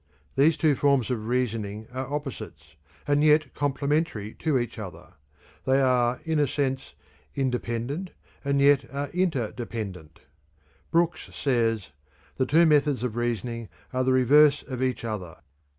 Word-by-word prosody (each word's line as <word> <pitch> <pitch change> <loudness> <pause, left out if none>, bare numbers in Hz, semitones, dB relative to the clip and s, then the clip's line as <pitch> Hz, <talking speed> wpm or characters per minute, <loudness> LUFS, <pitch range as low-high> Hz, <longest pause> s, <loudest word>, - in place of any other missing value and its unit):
These 150 +4 +4
two 155 -3 +3
forms 135 -2 +2
of 110 -3 -3
reasoning 110 -4 -2
are 130 +1 -4
opposites 145 -4 -6 0.3
and 145 0 +3
yet 150 -3 +4
complementary 145 -5 -1
to 155 -4 +1
each 120 -2 -3
other; 90 -5 -9 0.5
they 135 +1 +3
are 125 -2 +2
in 160 -1 +1
a 145 - +3
sense 135 - -2 0.4
independent 130 +5 -2 0.3
and 140 0 +1
yet 140 -1 +5
are 140 +1 -3
interdependent. 115 - -3 0.7
Brooks 170 +1 +1
says: 115 - 0 0.5
"The 130 - +1
two 165 +5 +5
methods 145 -4 +3
of 120 -3 -2
reasoning 120 -1 -2 0.2
are 130 0 +1
the 130 - +2
reverse 140 +3 +5
of 130 -2 -6
each 130 -2 -1
other. 95 -6 -5
130 Hz, 135 wpm, -26 LUFS, 115-145 Hz, 0.7 s, yet